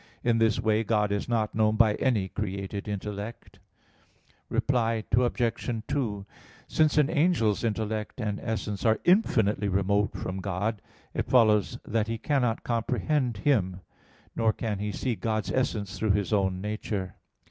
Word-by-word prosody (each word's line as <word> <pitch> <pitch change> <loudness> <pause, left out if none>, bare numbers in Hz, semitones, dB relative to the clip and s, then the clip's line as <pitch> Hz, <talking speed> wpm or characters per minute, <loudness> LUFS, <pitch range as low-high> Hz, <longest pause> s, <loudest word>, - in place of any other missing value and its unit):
In 120 -1 +2
this 115 -1 +3
way 110 0 +2
God 105 -2 +1
is 100 +3 -2
not 110 -3 0
known 110 0 +2
by 110 -1 +5
any 110 -5 +1
created 100 0 -4
intellect. 105 +2 -6 0.9
Reply 115 -4 +1
Obj. 120 -2 0
2: 105 -8 -2 0.4
Since 155 -1 +2
an 150 -2 +5
angel's 150 - +2
intellect 110 0 -2
and 105 -3 -2
essence 105 -3 -3
are 110 -1 +3
infinitely 110 - +3
remote 100 +2 +1
from 90 +1 -4
God, 100 +2 -2 0.3
it - - -2
follows 110 -5 +4
that 110 0 0
he 115 0 -2
cannot 125 -2 0
comprehend 125 +1 0
Him; 95 -10 +2 0.5
nor 115 -1 +3
can 105 -2 -3
he 105 0 -2
see 125 +4 -2
God's 110 -2 -2
essence 105 -6 -1
through 110 -3 +2
his 100 +1 0
own 95 -2 +1
nature. 105 -2 -3
110 Hz, 145 wpm, -27 LUFS, 100-115 Hz, 0.9 s, by